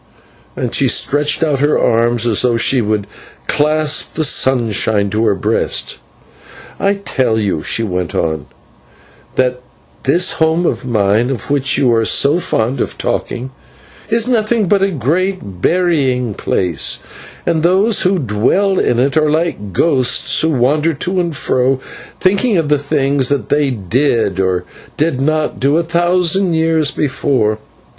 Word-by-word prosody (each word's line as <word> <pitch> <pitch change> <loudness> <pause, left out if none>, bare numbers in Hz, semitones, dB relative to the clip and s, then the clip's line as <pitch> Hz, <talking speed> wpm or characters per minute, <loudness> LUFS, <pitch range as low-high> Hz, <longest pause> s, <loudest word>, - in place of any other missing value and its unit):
and - - -3
she - - +3
stretched 145 +2 +1
out 150 -4 0
her 145 +2 +2
arms 115 0 +1
as 115 -4 +2
though 120 -2 +1
she 125 +2 +2
would 105 -2 -1 0.4
clasp 155 +1 +1
the 160 - 0
sunshine 110 -7 +1
to 110 +1 0
her 105 -2 +2
breast. - - -1 0.8
"I 200 +1 +1
tell 130 - -1
you," 100 -7 -1
she 115 - 0
went 90 -4 -3
on, 80 -3 -2 0.9
"that 125 -1 0 0.4
this 170 +7 +2
home 160 +2 +1
of 130 - -2
mine, 110 +1 +1
of 135 +1 -5
which 135 -2 +1
you 125 -3 +2
are 115 0 +2
so 145 +8 +3
fond 125 -5 -1
of - - -3
talking, 130 +2 -3 0.6
is 230 +1 +1
nothing 225 -3 +1
but 200 +2 +2
a 195 - +2
great 165 - -2
burying 135 - +1
place, 90 -3 -1 0.5
and 165 -2 0
those 190 +6 +2
who 185 +1 +2
dwell 160 - +1
in 120 - +1
it 135 +4 +1
are 155 -1 +2
like 155 - -2
ghosts 130 - +2
who 160 - +1
wander 150 +4 +1
to 180 +6 -2
and 170 -3 -2
fro 130 0 0 0.4
thinking 200 +3 +1
of 160 -3 -1
the 150 -1 +2
things 140 -2 0
that 140 -7 -2
they 145 -1 +1
did, 115 -2 0
or 95 -1 0 0.3
did 150 -4 0
not 155 +2 -1
do, 140 +4 +2
a 170 - +1
thousand 175 +1 +1
years 160 -2 +2
before. 130 -7 -1
140 Hz, 150 wpm, -15 LUFS, 115-165 Hz, 0.9 s, she